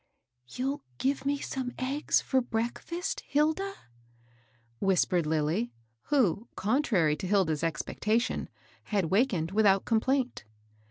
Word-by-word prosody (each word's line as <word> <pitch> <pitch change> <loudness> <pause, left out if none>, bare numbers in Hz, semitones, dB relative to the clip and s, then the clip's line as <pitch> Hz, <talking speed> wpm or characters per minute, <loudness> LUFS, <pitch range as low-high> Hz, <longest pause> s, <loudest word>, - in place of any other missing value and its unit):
" 125 0 -50
You'll 270 +3 -2 0.2
give 275 - 0
me 285 0 +2
some 260 -3 -4
eggs 270 +4 +1
for 260 -1 +1
breakfast, 245 +10 -3
Hil 300 +2 +2
da?" 390 +3 -4 1.1
whispered 180 -3 +2
Lilly, 150 -6 0 0.3
who, 235 - +2
contrary 200 - +2
to 185 - -4
Hilda's 180 -6 +2
expectation, 210 +8 -1 0.4
had 195 -6 0
wakened 190 -6 +2
without 200 -2 +4
complaint. 255 - +1
220 Hz, 115 wpm, -29 LUFS, 175-270 Hz, 1.1 s, without